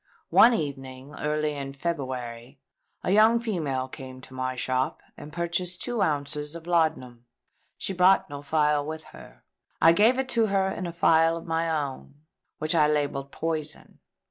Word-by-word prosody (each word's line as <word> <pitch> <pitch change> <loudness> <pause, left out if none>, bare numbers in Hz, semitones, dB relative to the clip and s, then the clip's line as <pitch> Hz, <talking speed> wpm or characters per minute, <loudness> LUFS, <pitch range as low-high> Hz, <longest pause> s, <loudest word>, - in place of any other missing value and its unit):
One 240 +1 +7
evening, 135 -4 -5
early 150 0 -1
in 140 -1 -6
February, 130 -4 -5 0.4
a - - 0
young 220 +3 +5
female 155 - -2
came 130 0 -9
to 130 - -13
my 130 0 -3
shop 130 +1 -1 0.2
and 150 - -10
purchased 170 +2 -3
two 240 -3 -2
ounces 150 0 -1
of 165 -1 -9
laudanum. 155 -9 0 0.5
She 195 - -3
brought 185 +1 +4
no 145 -1 -7
phial 150 0 +1
with 155 +1 -6
her. - - -14 0.4
I 165 - +7
gave 220 +7 +4
it 265 0 -1
to 230 -3 +2
her 195 -1 +1
in 185 -1 -4
a - - -4
phial 165 -1 +3
of 165 - -9
my 165 0 -1
own, 145 -3 -3 0.4
which 155 +3 -1
I 155 -3 +4
labelled 145 -2 -1
Poison. 155 -2 -4
150 Hz, 165 wpm, -26 LUFS, 135-170 Hz, 0.5 s, One